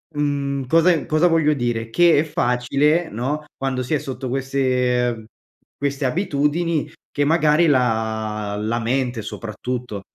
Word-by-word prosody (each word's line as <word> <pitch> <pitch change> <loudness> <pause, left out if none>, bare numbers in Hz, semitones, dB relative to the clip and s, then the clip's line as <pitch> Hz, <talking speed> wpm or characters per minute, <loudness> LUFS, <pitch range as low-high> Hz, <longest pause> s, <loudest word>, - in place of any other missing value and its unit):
mhmm, 140 -2 -1
cosa 165 +5 +4
e 165 -4 0
cosa 155 +3 +3
voglio 160 -3 +3
dire, 120 -4 -2
che 170 +4 +4
è - - +3
facile, 150 +4 +1
no, 135 +7 -3
quando 135 -1 -2
si 125 - -3
è - - 0
sotto 130 -1 -5
queste 125 -3 0 0.5
queste 140 0 -2
abitudini, 155 +1 0 0.2
che 145 - 0
magari 155 +1 +3
la 110 -5 0
la 110 +2 -1
mente 120 0 -1
soprattutto, 115 0 -5
135 Hz, 135 wpm, -21 LUFS, 120-150 Hz, 0.5 s, cosa